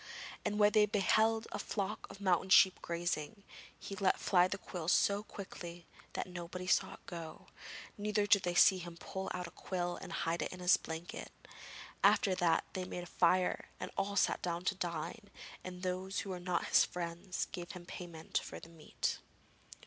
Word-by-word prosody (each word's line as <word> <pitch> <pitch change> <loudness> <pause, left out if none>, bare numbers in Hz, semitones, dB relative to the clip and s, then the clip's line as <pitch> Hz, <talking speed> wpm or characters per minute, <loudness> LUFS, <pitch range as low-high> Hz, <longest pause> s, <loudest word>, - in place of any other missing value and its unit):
And 210 - -1
when 210 0 +6
they 210 0 +5
beheld 220 +2 +3
a - - -3
flock 200 -3 -3
of - - -11
mountain 190 -2 +2
sheep 190 -1 +7
grazing, 170 +3 -3 0.3
he 200 - -7
let 195 -2 +2
fly 180 -2 +4
the 195 - -3
quill 175 -4 -6
so 200 +3 +4
quickly 175 -5 -8 0.3
that - - -2
nobody 180 0 -6
saw 180 - +2
it - - -22
go, 165 -2 -8 0.5
neither 210 0 +1
did 205 -1 +5
they 175 -1 -1
see 185 +1 +7
him 175 -1 -8
pull 190 +2 -5
out 180 0 -3
the 170 - -8
quill 175 0 -3
and 185 - -8
hide 165 0 -1
it - - -2
in 185 - -8
his 180 0 +6
blanket. 160 +1 -6 0.7
After 195 - +5
that 175 -3 +3
they 185 - -2
made 180 -1 -5
a 175 - -12
fire 180 +1 +3
and - - -5
all 200 +1 -1
sat - - +2
down 175 0 -2
to 200 - +2
dine, 180 +4 -4 0.3
and 180 0 -7
those 185 +1 -2
who 195 - -5
were 180 - -4
not 175 -1 -1
his - - +6
friends 175 +1 -3
gave 175 -1 -6
him 180 -1 -9
payment 170 -2 -4
for - - -8
the 165 - -13
meat. 165 -2 -3
180 Hz, 185 wpm, -35 LUFS, 175-195 Hz, 0.7 s, sheep